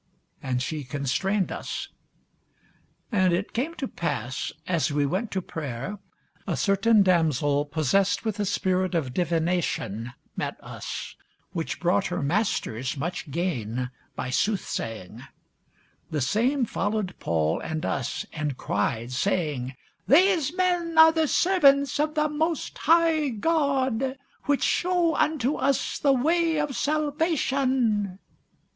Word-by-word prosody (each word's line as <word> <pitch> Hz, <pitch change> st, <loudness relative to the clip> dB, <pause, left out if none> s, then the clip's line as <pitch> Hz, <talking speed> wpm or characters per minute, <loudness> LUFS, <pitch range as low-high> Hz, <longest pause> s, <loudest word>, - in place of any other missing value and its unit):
And 125 Hz, -1 st, -1 dB
she 155 Hz, +1 st, -3 dB
constrained 145 Hz, +10 st, -1 dB
us. -, -, -5 dB, 1.2 s
And 185 Hz, -5 st, +3 dB
it 185 Hz, +4 st, -2 dB
came 290 Hz, +8 st, -2 dB
to 270 Hz, -, -3 dB
pass, 130 Hz, -, -3 dB
as 170 Hz, -4 st, 0 dB
we 145 Hz, 0 st, +1 dB
went 190 Hz, +10 st, -1 dB
to 190 Hz, -2 st, -3 dB
prayer, 155 Hz, -, -5 dB, 0.5 s
a -, -, -1 dB
certain 205 Hz, +1 st, +4 dB
damsel 150 Hz, -5 st, +2 dB
possessed 165 Hz, -, +1 dB
with 215 Hz, -1 st, -2 dB
a 205 Hz, -, +1 dB
spirit 185 Hz, -1 st, 0 dB
of 135 Hz, -7 st, -1 dB
divination 165 Hz, -, -1 dB, 0.2 s
met -, -, -3 dB
us, -, -, -6 dB, 0.4 s
which -, -, -3 dB
brought -, -, +2 dB
her -, -, -2 dB
masters 140 Hz, -, -1 dB
much 170 Hz, +2 st, -4 dB
gain 125 Hz, -, -2 dB, 0.2 s
by 130 Hz, -, -4 dB
soothsaying: 115 Hz, -, -2 dB, 0.9 s
the 150 Hz, -, -1 dB
same 240 Hz, -, +1 dB
followed 205 Hz, -3 st, -2 dB
Paul 80 Hz, -1 st, 0 dB
and 155 Hz, -1 st, -4 dB
us, 135 Hz, -4 st, -2 dB
and 150 Hz, -4 st, -3 dB
cried, 110 Hz, +4 st, -1 dB
saying, 140 Hz, -4 st, -1 dB, 0.3 s
These 335 Hz, -1 st, +4 dB
men 355 Hz, -3 st, 0 dB
are 320 Hz, 0 st, +9 dB
the 320 Hz, -1 st, +1 dB
servants 280 Hz, -6 st, +4 dB
of 305 Hz, +1 st, 0 dB
the 305 Hz, 0 st, +2 dB
most 315 Hz, +1 st, -2 dB
high 325 Hz, -2 st, +3 dB
God, 265 Hz, -1 st, 0 dB, 0.3 s
which 285 Hz, -1 st, +1 dB
shew 355 Hz, -2 st, +2 dB
unto 300 Hz, -3 st, +1 dB
us 275 Hz, 0 st, 0 dB
the 280 Hz, -, +4 dB
way 325 Hz, +4 st, +2 dB
of 295 Hz, -3 st, -1 dB
salvation. 275 Hz, -, +1 dB
200 Hz, 125 wpm, -26 LUFS, -, 1.2 s, are